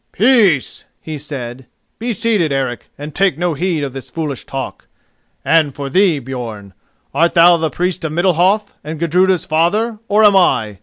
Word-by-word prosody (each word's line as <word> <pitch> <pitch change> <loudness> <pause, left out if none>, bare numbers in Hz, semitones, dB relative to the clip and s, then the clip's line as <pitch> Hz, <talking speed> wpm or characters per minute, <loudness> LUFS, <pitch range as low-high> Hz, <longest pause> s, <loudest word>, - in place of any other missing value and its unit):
"Peace!" 210 - +2
he 155 -2 -7
said. 130 -3 -7 0.3
"Be 240 +2 -2
seated, 210 -7 0
Eric, 130 -3 -3
and 145 +1 -8
take 190 -6 +1
no 175 0 0
heed 165 0 -1
of 135 -2 -4
this 135 -1 -8
foolish 150 -5 -5
talk. 135 -1 -6 0.6
And 155 -4 +2
for 140 -1 -5
thee, 185 -3 +3
Björn, 120 -6 -7 0.4
art 170 +1 +2
thou 170 +1 +7
the 160 -1 -1
Priest 180 +2 -2
of 160 - -2
Middalhof, 185 +5 +1
and 155 +1 -6
Gudruda's 180 +2 +2
father, 210 +8 0
or 210 +2 +3
am 205 -2 +6
I? 110 - +2
165 Hz, 165 wpm, -17 LUFS, 140-190 Hz, 0.6 s, thou